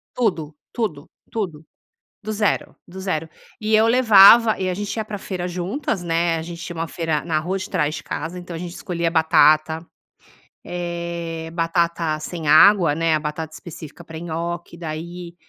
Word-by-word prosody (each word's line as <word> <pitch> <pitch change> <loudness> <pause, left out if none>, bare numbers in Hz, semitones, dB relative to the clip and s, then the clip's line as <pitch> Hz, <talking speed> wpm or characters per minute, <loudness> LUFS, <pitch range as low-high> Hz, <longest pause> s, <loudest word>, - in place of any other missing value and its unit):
Tudo, 160 -11 -1 0.2
tudo, 170 - -3 0.2
tudo, 175 -9 -4 0.6
do 215 - -4
zero, 210 -1 0
do 185 +2 -10
zero, 165 -4 -2 0.3
e 215 0 +2
eu 220 +1 +5
levava 230 -2 +7
e 185 - -1
a 180 - 0
gente 205 +3 -4
ia 220 - -2
pra 210 -1 -6
feira 180 -2 -4
juntas, 185 - -3
né, 165 0 +1
a - - -4
gente 170 +1 -8
tinha 175 - -7
uma 165 0 -3
feira 160 -3 -2
na 160 -2 0
rua 180 +5 -2
de 190 - -6
trás 150 0 0
de - - -7
casa, 165 +5 -5
então 175 -1 -8
a 165 - -5
gente 175 -1 -6
escolhia 170 -2 -2
batata, 160 0 +4 0.8
eh, 170 -2 -4
batata 165 -1 0
sem 160 -1 -5
água, 175 0 +7
né. 165 0 +1
A 155 - +1
batata 155 +1 -5
específica 160 -1 -10
para 160 0 -9
nhoque, 170 +1 -5
daí, 170 +2 -7
170 Hz, 175 wpm, -22 LUFS, 160-185 Hz, 0.8 s, levava